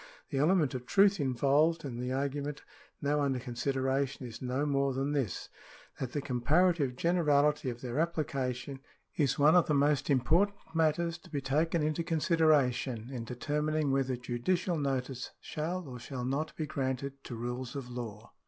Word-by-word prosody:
The 135 - 0
element 155 -2 +3
of 125 -1 -5
truth 200 +3 +4
involved 145 +5 +2
in 120 -3 -5
the 125 +1 -2
argument 140 +2 -2 0.4
now 145 +1 +2
under 135 -2 +1
consideration 130 +2 -1
is 115 -1 -8
no 130 +3 -1
more 140 -2 +1
than 135 +2 -1
this, 135 - -2 0.5
that 130 -2 -4
the 145 - -2
comparative 140 +2 +2
generality 150 -3 +2
of 120 0 -6
their 125 +2 -3
application 140 -5 -2 0.4
is 145 -4 +1
one 150 +2 +6
of 180 - +5
the 150 - +2
most 145 0 +2
important 165 +10 +3 0.2
matters 165 +1 +1
to - - -17
be 145 - -2
taken 155 +4 +1
into 155 +2 0
consideration 145 -8 +2
in 120 -3 -5
determining 150 +4 -1
whether 135 -1 +1
judicial 130 +10 -1
notice 135 -2 -2
shall 170 +2 -4
or 125 -2 -7
shall 125 +1 -5
not 140 +5 -2
be 155 - -2
granted 135 -1 -3
to 120 - -6
rules 120 +3 -4
of 135 -3 -5
law. 115 -2 -7
140 Hz, 160 wpm, -31 LUFS, 125-155 Hz, 0.5 s, one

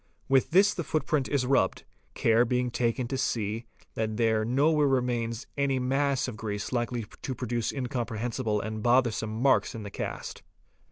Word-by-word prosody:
With 135 -1 +3
this 195 +4 +5
the 170 - -3
footprint 150 -2 0
is 140 -3 +1
rubbed, 125 -8 +2 0.3
care 115 +1 +4
being 125 0 0
taken 120 +1 0
to 135 - -2
see 110 -2 -1 0.3
that 110 -1 -2
there 110 -2 +2
nowhere 145 +5 +3
remains 120 -3 0
any.mass 135 0 +1
of 125 - -5
grease 105 -1 -4
likely 120 -2 -1 0.2
to 130 - -4
produce 120 -2 -2
incomprehensible 120 -3 -2
and 110 0 -4
bothersome 120 -2 +2
marks 130 -1 +3
in 110 - -6
the 100 - -7
cast. - - -5
125 Hz, 155 wpm, -28 LUFS, 115-135 Hz, 0.3 s, this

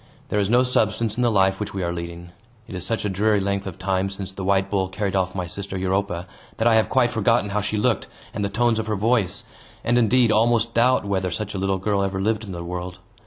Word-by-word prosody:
There 105 - +1
is 100 -1 +1
no 120 +2 +5
substance 110 -3 +1
in 125 - -1
the 120 - +3
life 95 -3 +2
which 105 -2 -5
we 95 - -2
are 85 0 -1
leading. 85 0 -7 0.4
It - - -9
is 90 -2 -5
such 110 +3 -2
a - - +2
dreary 105 +2 +2
length 100 0 -2
of 95 - -7
time 95 0 0
since 95 -1 -6
the 95 0 -7
white 95 0 +2
bull 95 -2 0
carried 95 0 -2
off 95 0 0
my 90 -1 -2
sister 95 +2 -6
Europa, 95 -1 -1 0.3
that 110 - +2
I 115 - +5
have 110 -1 +3
quite 125 -2 +3
forgotten 115 -1 +1
how 105 +1 0
she 105 +1 -2
looked, 115 +2 +1 0.3
and 105 -3 -3
the 100 - 0
tones 115 +2 +1
of 110 - -3
her 110 - 0
voice, 105 -2 0 0.4
and, 120 +1 +3
indeed, 120 0 +4
almost 115 +1 +2
doubt 125 0 +3
whether 95 -2 -1
such 105 +4 -4
a 95 - -3
little 95 0 0
girl 100 +1 0
ever 95 -1 -1
lived 110 +2 0
in 100 - -7
the 85 -1 -5
world. 90 +1 -5
100 Hz, 255 wpm, -23 LUFS, 95-110 Hz, 0.4 s, no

